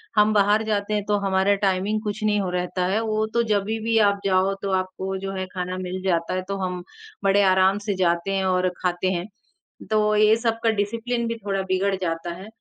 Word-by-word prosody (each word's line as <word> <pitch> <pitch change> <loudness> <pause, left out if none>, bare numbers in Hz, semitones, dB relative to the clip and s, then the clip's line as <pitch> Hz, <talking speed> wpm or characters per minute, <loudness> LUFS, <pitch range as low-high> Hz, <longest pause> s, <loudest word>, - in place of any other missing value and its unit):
हम 210 0 +4
बाहर 210 +1 +3
जाते 210 -1 -1
हैं 210 -1 0
तो 205 0 +1
हमारा 190 +1 +3
टाइमिंग 195 +3 0
कुछ 210 0 -4
नहीं 210 -1 +2
हो 190 - -2
रहता 180 0 -2
है। 215 - +2
वो 215 -1 0
तो 235 - +2
जभी 210 +2 -1
भी 225 0 +1
आप 200 0 -2
जाओ 190 0 +2
तो 195 - -2
आपको 190 +1 -4
जो 195 0 -5
है 190 -1 -3
खाना 180 0 -3
मिल 185 0 -4
जाता 170 -3 0
है 185 - -1
तो 195 0 -3
हम 180 -1 -4 0.4
बड़े 195 +1 +4
आराम 190 +1 +4
से 200 - 0
जाते 170 +2 +1
हैं 190 0 0
और 185 0 +2
खाते 180 +1 -1
हैं। 175 0 -3 0.6
तो 215 0 +3
यही 215 +1 +5
सब 230 -1 0
का 230 - +4
डिसिप्लिन 230 +4 -1
भी 230 - -2
थोड़ा 195 -1 0
बिगड़ 195 +1 +1
जाता 165 0 -2
है। 185 +4 -10
195 Hz, 220 wpm, -23 LUFS, 185-210 Hz, 0.6 s, यही